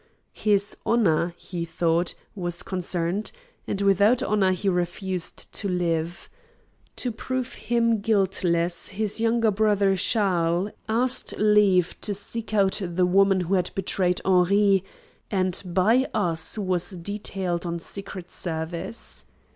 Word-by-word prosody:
His 205 -1 +2
honor, 175 -7 +2
he 175 -3 -5
thought, 170 +1 0 0.2
was 175 -3 -2
concerned, 180 +1 -1 0.4
and 200 - -2
without 200 +5 +4
honor 200 -3 +2
he 185 +2 -2
refused 180 0 -2
to 200 - -2
live. 170 -1 -1 0.7
To 250 - -2
prove 255 +2 -4
him 230 -2 +1
guiltless 185 -5 +1
his 210 +2 -2
younger 230 -1 +2
brother 200 -1 +2
Charles 185 -2 +1 0.2
asked 245 +3 +1
leave 210 -4 +3
to 205 - -2
seek 220 +2 -7
out 200 -1 +2
the 180 0 +1
woman 195 +1 +4
who 180 +2 -2
had 180 -2 +2
betrayed 180 -2 0
Henri, 195 +1 +4 0.5
and 185 -2 +1
by 200 +8 +2
us 170 -4 0
was 185 -4 0
detailed 185 -1 -3
on 170 0 -2
secret 185 +1 -7
service. 160 - -5
190 Hz, 125 wpm, -25 LUFS, 175-210 Hz, 0.7 s, without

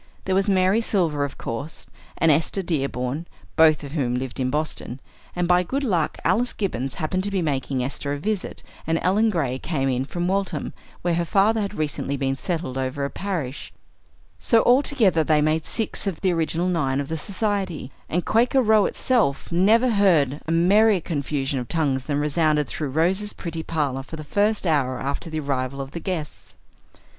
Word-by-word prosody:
There 190 - 0
was 195 +2 +2
Mary 190 +3 +3
Silver, 170 -10 0
of 140 - -8
course, 140 +8 -5 0.3
and 165 - +4
Esther 165 +6 +1
Dearborn, 140 -1 -2 0.3
both 155 -2 +5
of 140 - -7
whom 130 -6 -1
lived 130 0 -4
in 130 -1 0
Boston; 150 -3 -3 0.4
and 175 -1 0
by 180 0 +4
good 270 +10 -2
luck 180 - 0
Alice 225 +8 +2
Gibbons 135 - -3
happened 185 +2 -1
to 205 - 0
be 195 -3 -1
making 135 -3 -1
Esther 140 +2 -3
a - - -2
visit, 205 +5 -3 0.2
and 165 0 +2
Ellen 210 +5 +3
Gray 140 -10 -1
came 135 -4 -1
in 130 0 0
from 175 +4 -3
Waltham, 195 +1 -1 0.3
where 175 -1 +1
her 170 +1 +1
father 205 +5 +2
had 205 0 -3
recently 145 -3 -2
been 135 0 0
settled 145 -3 -3
over 130 +2 -2
a 140 - -4
parish, 165 -9 -4 0.7
so 230 - +3
that - - +4
all 250 +3 +5
together 215 - +2
they 155 -1 +3
made 155 +1 +1
six 225 -2 -1
of 190 -5 -2
the 190 - +2
original 165 +1 0
nine 145 -7 0
of 140 - -3
the 160 - -3
society; 190 - -2 0.2
and 175 +2 -1
Quaker 240 +4 +3
Row 215 -2 +4
itself 220 - 0
never 215 +8 +4
heard 165 - +3
a - - -1
merrier 200 +5 +4
confusion 145 -4 -2
of 125 - -5
tongues 135 -4 0
than 145 -1 -1
resounded 150 0 +2
through 150 0 -4
Rose's 185 +8 +1
pretty 165 -2 -5
parlor 145 -5 -2
for 145 - -9
the 155 - -7
first 205 +7 +1
hour 135 -6 +1
after 140 +4 -3
the 155 -1 -3
arrival 140 -1 -2
of 135 0 -5
the 170 - -5
guests. 170 -5 -5
160 Hz, 190 wpm, -23 LUFS, 140-195 Hz, 0.7 s, both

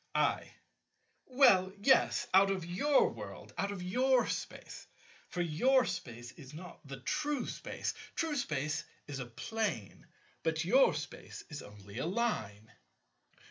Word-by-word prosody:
I. - - +1 0.8
Well, 195 -9 +5
yes. 240 +1 +4
Out 195 +1 +7
of 190 -3 -1
your 235 - +3
world. - - -9
Out 200 +1 -1
of 190 -3 -5
your 255 +7 +3
Space. - - -5 0.4
For 180 - -2
your 250 - +3
Space 120 -10 -5
is 145 -1 -12
not 180 +3 -9
the 135 -1 -8
true 295 - -1
Space. - - -4 0.2
True 325 -3 0
Space 155 - -1 0.2
is 140 -2 -5
a 125 - -5
Plane; 220 - -3 0.3
but - - 0
your - - +5
Space - - -7
is 150 - -5
only 105 +2 -10
a 150 - -1
Line. 110 - -2
185 Hz, 140 wpm, -33 LUFS, -, 0.8 s, Out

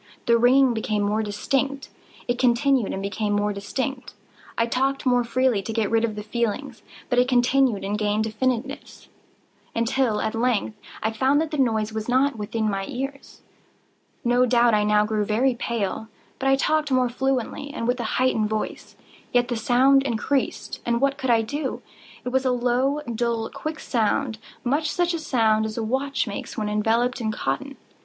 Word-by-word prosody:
The 235 - +4
ringing 250 +2 +5
became 215 -2 -1
more 210 +2 +1
distinct:—it 250 +3 -3
continued 250 -1 +2
and 195 - -4
became 205 +1 -1
more 205 0 +1
distinct: 250 +6 -4 0.4
I 230 - +3
talked 270 +4 -1
more 245 -1 +3
freely 245 -2 +1
to 210 - -5
get 220 -2 -1
rid 225 0 +3
of 220 -2 -1
the 210 - -5
feeling: 235 +4 -2 0.3
but 245 -1 +2
it 250 - +3
continued 250 -3 +2
and 205 +2 -2
gained 210 0 +1
definiteness—until, 235 0 -3
at 220 - -1
length, 230 -2 0 0.3
I 220 - +1
found 265 +6 +2
that 320 0 -1
the 300 - -2
noise 220 -4 +1
was 220 +1 -4
not 265 +2 +3
within 220 +1 -2
my 195 -2 -2
ears. 275 +2 -6 0.8
No 245 +1 +3
doubt 240 -1 +4
I 210 0 +3
now 210 0 +3
grew 215 -1 0
very 235 +6 +2
pale;—but 230 +3 -4
I 270 - +5
talked 305 +2 +1
more 255 -1 +3
fluently, 265 +3 -2
and 235 -6 -4
with 245 +1 +1
a - - -1
heightened 225 -5 +2
voice. 215 0 -4 0.4
Yet 245 -1 +2
the 240 - -1
sound 255 +4 +4
increased—and 240 -1 -1
what 275 +1 +1
could 260 - -2
I 230 -1 +4
do? 285 +4 -4 0.4
It - - -1
was 260 +1 +1
a 260 - +2
low, 250 +4 +1
dull, 235 -2 -2
quick 310 0 -5
sound—much 245 +5 -1
such 350 +2 0
a 335 - -2
sound 220 -7 +2
as 215 - -7
a 230 - -1
watch 270 +5 -1
makes 200 -3 -6
when 210 -1 -1
enveloped 230 +4 +1
in 220 -1 -1
cotton. 275 +5 -3
240 Hz, 170 wpm, -24 LUFS, 220-265 Hz, 0.8 s, ringing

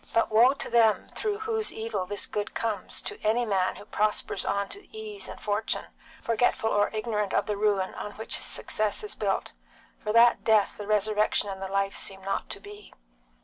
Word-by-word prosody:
But 230 -1 +3
woe 240 +5 +6
to - - -4
them 225 -2 +3
through 420 -1 -2
whose 440 -1 0
evil 220 -4 -3
this 205 0 -2
good 210 0 -4
comes, 215 -4 -2
to - - -6
any 230 +3 +2
man 190 -4 +1
who - - -11
prospers 210 -2 0
on 200 0 0
to 405 - -6
ease 435 -2 -5
and - - -8
fortune, 210 +1 -1 0.4
forgetful 230 -1 +1
or 205 0 +3
ignorant 215 -2 -2
of - - +2
the 210 - -1
ruin 200 -2 +1
on 205 - -6
which 220 - 0
his - - -2
success 215 - -1
is 420 - -4
built. - - -1 0.5
For 210 - -2
that 235 +2 +6
death 215 -3 +3
the 205 - -7
resurrection 210 0 +2
and 190 -1 -6
the 190 - -3
life 195 0 0
seem 195 -1 -3
not 195 0 -2
to - - -5
be. 205 +1 -12
215 Hz, 195 wpm, -28 LUFS, 200-230 Hz, 0.5 s, woe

